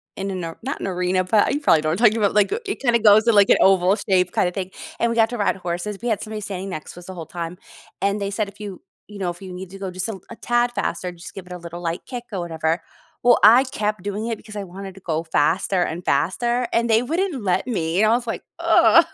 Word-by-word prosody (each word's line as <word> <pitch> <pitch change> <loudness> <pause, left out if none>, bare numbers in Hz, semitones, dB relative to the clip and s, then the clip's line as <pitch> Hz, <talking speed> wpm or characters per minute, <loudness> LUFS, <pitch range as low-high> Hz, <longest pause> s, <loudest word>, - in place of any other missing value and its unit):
in 195 0 -4
a - - -3 0.3
not 275 - -3
an - - -3
arena, 180 0 0
but 210 +7 +3
you 290 - 0
probably 165 - +4
know 155 - -1
what 170 - -1
I'm 240 - +4
talking 215 +2 +1
about, 205 -2 +2
like, 205 -1 +3
it 400 - -3
kinda 240 -3 +2
goes 215 -1 +6
to, 235 - +5
like, 200 -1 +5
an - - +6
oval 190 0 +5
shape 185 -4 +1
kinda 180 - +1
thing, 185 0 -4 0.3
and 235 - +2
we 230 - -1
got 225 -1 +4
to 240 - -3
ride 205 - +2
horses, 180 +3 -4
we - - -2
had 220 -4 0
somebody 215 0 -5
standing 195 -1 -5
next 155 -5 -7
to - - -11
us 175 - -14
the 190 - -7
whole 170 -3 -7
time 170 +2 -6 0.4
and 200 +1 0
they 200 - -1
said, 210 0 -1
"If 200 +1 -14
you, 200 -3 -7 0.3
you 210 -1 -10
know, 185 -2 -1
if 175 - -13
you 190 -1 -8
need 180 0 -8
to 195 - -10
go 190 -2 -4
just 185 +4 -3
a 210 -4 -5
a 235 - -8
tad 240 0 +1
faster, 180 - -2
just 175 0 -11
give 190 -2 -9
it 180 - -13
a - - -5
little 170 0 -8
light 170 0 -3
kick 245 -2 -6
or 190 - -3
whatever." 165 -1 -1 0.4
Well, 245 -1 +5
I 230 +5 +8
kept 215 -7 -3
doing 205 +3 -3
it 230 - -1
because 215 -1 -11
I 200 - -4
wanted 190 +1 -9
to 195 - -14
go 160 -2 -2
faster 170 +4 +1
and 175 +1 -2
faster, 235 - +1
and 230 0 +1
they 225 +1 +4
wouldn't 325 +2 -1
let 185 -2 0
me, 180 -4 0
and 215 - +4
I - - +5
was 240 -1 -8
like, 225 - -4 0.2
"Ugh." - - +6
195 Hz, 280 wpm, -22 LUFS, 180-225 Hz, 0.4 s, I